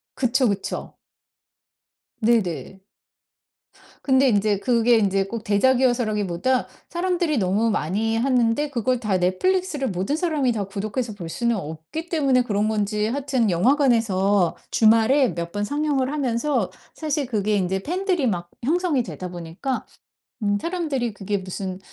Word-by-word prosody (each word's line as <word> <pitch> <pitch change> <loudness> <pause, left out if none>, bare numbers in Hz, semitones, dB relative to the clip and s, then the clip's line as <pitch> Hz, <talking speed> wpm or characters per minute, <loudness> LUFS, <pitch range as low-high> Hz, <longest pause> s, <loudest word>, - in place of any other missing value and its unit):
그쵸, 255 0 +2
그쵸. 200 -1 -4 1.2
네네. 200 -4 0 1.2
근데 265 -1 +4
인제 205 -1 +2
그게 235 0 +3
인제 195 -2 +2
꼭 220 +2 -6
대작이어서라기보다 240 -1 +1 0.2
사람들이 345 -4 0
너무 205 +3 +1
많이 210 +5 0
하는데 250 +2 +2
그걸 250 -1 0
다 210 -5 0
넷플릭스를 290 - 0
모든 190 +9 -1
사람이 310 -7 +1
다 215 -3 -1
구독해서 215 +4 -3
볼 175 -5 -8
수는 235 +5 0
없기 160 - -7
때문에 270 -6 +2
그런 210 -2 0
건지 210 0 0
하여튼 260 -3 0
영화관에서 205 - +2 0.2
주말에 230 +4 +4
몇 170 -1 -3
번 205 - -1
상영을 285 +1 0
하면서 255 -5 0 0.2
사실 300 -2 -2
그게 215 -4 0
인제 190 -1 0
팬들이 360 - 0
막 175 -5 -2
형성이 320 -1 +1
되다 185 -5 -6
보니까 175 +10 -4 0.6
음 205 0 +2
사람들이 300 - -2
그게 200 0 -2
무슨 185 0 -5
230 Hz, 305 characters per minute, -23 LUFS, 200-270 Hz, 1.2 s, 근데